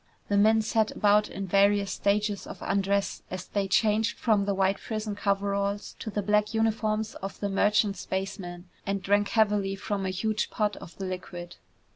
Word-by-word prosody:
The 205 - +2
men 220 +2 +5
sat 220 0 +1
about 210 0 +3
in 195 - -5
various 200 +1 +3
stages 205 0 0
of - - -8
undress 200 0 0
as 185 0 -5
they 200 -1 -1
changed 215 +3 +2
from 210 -4 +2
the 200 -1 0
white 195 +1 +2
prison 215 -1 -4
coveralls 200 0 -1
to - - -5
the 205 -1 -2
black 210 +2 +1
uniforms 220 -1 0
of 195 0 -7
the 200 - -1
merchant 205 +1 +2
spaceman, 190 -2 -5 0.2
and 195 -1 -2
drank 205 +1 +3
heavily 205 -3 +2
from 195 0 -3
a - - 0
huge 210 +3 -1
pot 210 -2 0
of 170 - -11
the 195 - -4
liquid. 175 -1 -6
200 Hz, 175 wpm, -28 LUFS, 195-210 Hz, 0.2 s, men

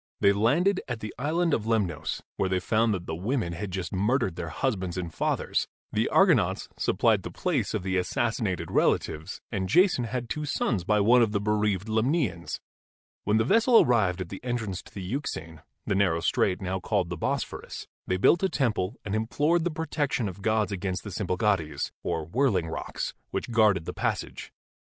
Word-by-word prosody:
They 100 0 +5
landed 160 - +2
at 125 -3 -3
the 110 -1 -6
Island 165 +4 +1
of 110 -1 0
Lemnos, 90 -9 -1
where 95 - 0
they 95 0 +1
found 110 +4 +2
that 90 -4 -2
the - - -4
women 95 +1 -1
had 100 +4 -4
just 90 -3 -4
murdered 100 -1 +1
their 85 - -5
husbands 95 - -2
and 85 -3 -4
fathers. - - 0 0.2
The - - +1
Argonauts - - +3
supplied - - +2
the - - -6
place - - -1
of - - -2
the 95 0 0
assassinated 105 0 -1
relatives, 80 +4 0
and 95 -4 -2
Jason 175 -8 +4
had 120 +1 -3
two 150 +7 -3
sons 120 -9 0
by 105 +3 +2
one 120 +4 +6
of 110 -2 +2
the 100 - +1
bereaved 105 -1 0
Lemnians. 110 - 0 0.7
When 105 +2 +3
the 110 - +3
vessel 230 - +5
arrived 95 -7 +2
at 90 - -5
the 95 - -8
entrance 115 -7 -3
to - - -17
the 95 - -7
Euxine 90 - -4
— - - -52
the - - 0
narrow 90 -4 +2
strait 95 +3 +1
now 95 +1 -2
called 95 -3 -1
the - - -1
Bosphorus - - -3
— - - -52
they 95 - +1
built 165 - +4
a 190 - +2
temple 110 - 0
and 105 - -3
implored 145 +10 +1
the - - +2
protection 150 -7 -1
of 95 - -6
the - - -14
gods 110 -1 +1
against 95 -1 -3
the 105 - -7
Symplegades, 90 -5 -1
or 80 -2 -2
Whirling 95 - +1
Rocks, - - -4 0.2
which - - -4
guarded 105 -7 +3
the - - -4
passage. - - -3
105 Hz, 195 wpm, -27 LUFS, 90-120 Hz, 0.7 s, one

